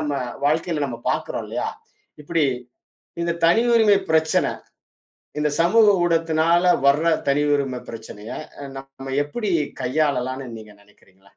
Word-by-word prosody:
நம்ம 150 Hz, -2 st, -2 dB, 0.3 s
வாழ்க்கையில 155 Hz, 0 st, 0 dB
நம்ம 120 Hz, -3 st, -6 dB
பாக்கறோம் -, -, -3 dB
இல்லையா? -, -, -2 dB, 0.5 s
இப்படி 160 Hz, +1 st, +1 dB, 0.8 s
இந்தத் 170 Hz, 0 st, -2 dB
தனி 175 Hz, +7 st, +4 dB
உரிமை 215 Hz, -3 st, +5 dB
பிரச்சன 160 Hz, 0 st, +2 dB, 0.9 s
இந்தச் 150 Hz, -1 st, 0 dB
சமூக 215 Hz, +6 st, +5 dB, 0.2 s
ஊடகத்தினால 165 Hz, +1 st, +3 dB
வர்ற 145 Hz, +4 st, +4 dB, 0.2 s
தனி 145 Hz, +1 st, +3 dB
உரிமை 135 Hz, -3 st, -2 dB
பிரச்சனைய 110 Hz, -1 st, -9 dB, 0.4 s
நம்ம 135 Hz, 0 st, -8 dB
எப்படி 205 Hz, +8 st, -4 dB, 0.3 s
கையாளலாம்ன்னு 130 Hz, -2 st, -1 dB
நீங்க 110 Hz, -1 st, -12 dB
நினைக்கிறீங்க? 95 Hz, -2 st, -26 dB
150 Hz, 115 wpm, -22 LUFS, 130-165 Hz, 0.9 s, உரிமை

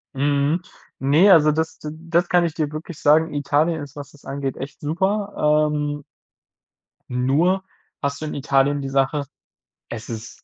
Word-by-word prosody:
Mhm. 145 Hz, +4 st, +1 dB, 0.4 s
Ne, 150 Hz, +9 st, +5 dB
also 155 Hz, -3 st, +6 dB
das 160 Hz, +1 st, -2 dB
d 150 Hz, -, -6 dB
das 170 Hz, +2 st, -1 dB
kann 175 Hz, -1 st, +4 dB
ich 160 Hz, -, -2 dB
dir 155 Hz, -2 st, -2 dB
wirklich 155 Hz, +1 st, -7 dB
sagen, 155 Hz, +2 st, +4 dB
Italien 145 Hz, +3 st, +1 dB
ist, 145 Hz, +1 st, -12 dB
was 145 Hz, 0 st, -9 dB
es 145 Hz, -, -19 dB
angeht, 135 Hz, -1 st, -4 dB
echt 140 Hz, +1 st, -8 dB
super. 160 Hz, -2 st, +1 dB
Ähm 145 Hz, -1 st, -3 dB, 1.0 s
nur 150 Hz, +10 st, +1 dB, 0.4 s
hast 140 Hz, +1 st, -2 dB
du -, -, -3 dB
in 150 Hz, -, -4 dB
Italien 140 Hz, 0 st, +1 dB
die 135 Hz, -, -4 dB
Sache, 135 Hz, +2 st, +1 dB, 0.7 s
es 115 Hz, 0 st, -7 dB
ist 115 Hz, 0 st, -8 dB
150 Hz, 160 wpm, -22 LUFS, 140-160 Hz, 1.0 s, also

